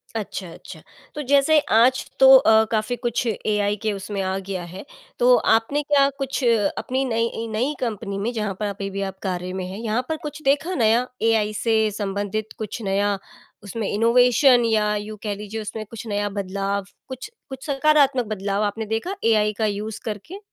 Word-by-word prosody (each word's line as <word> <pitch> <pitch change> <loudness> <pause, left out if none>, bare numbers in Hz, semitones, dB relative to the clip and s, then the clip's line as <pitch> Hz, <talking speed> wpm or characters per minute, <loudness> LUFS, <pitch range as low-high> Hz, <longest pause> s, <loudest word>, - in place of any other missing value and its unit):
अच्छा, 200 -4 -5
अच्छा, 165 -1 -12 0.3
तो 300 - -3
जैसे 285 +3 +4
आज 245 +4 +4
तो 265 0 +9
अ, 220 -4 +5
काफ़ी 220 +2 0
कुछ 240 0 -2
एआई 210 -1 0
के 220 -1 0
उसमें 200 0 -4
आ 190 0 -1
गया 185 -2 -3
है, 180 +6 -9 0.3
तो - - +6 0.2
आपने 230 +6 0
क्या 280 -1 +3
कुछ 270 0 -3 0.3
अपनी 260 +1 -1
नई 230 -1 -1
नई 245 +7 0
कंपनी 210 -4 -3
में, 220 +4 -1
जहाँ 210 -3 -2
पर 210 - -1
अभी 200 -1 -4
भी 195 0 -4
आप 190 - -12
कार्य 180 -1 -3
में 185 -1 -4
हैं 190 +2 -7
यहाँ 225 +1 -1
पर 320 - -1
कुछ 300 0 -6
देखा 290 +6 +1
नया 235 +1 +3
एआई 220 -2 +2
से 225 +1 +1
संबंधित 205 +1 -3
कुछ 220 +2 -5
नया? 200 0 0 0.5
उसमें 205 +1 -4
इनोवेशन 245 +3 +4
या 210 -2 +2
यूँ 210 +1 -5
कह 210 -2 -2
लीजिए 210 +2 -6
उसमें 215 +1 -6
कुछ 230 +2 -9
नया 205 -1 -1
बदलाव? 200 0 -3 0.2
कुछ 260 - -7 0.2
कुछ 265 -1 -8
सकारात्मक 280 -3 +3
बदलाव 205 -1 -2
आपने 210 +2 -2
देखा 225 - -3
एआई 215 -2 +3
का 220 - +1
यूज़ 210 +1 -3
करके? 225 - -6
220 Hz, 180 wpm, -23 LUFS, 205-250 Hz, 0.5 s, तो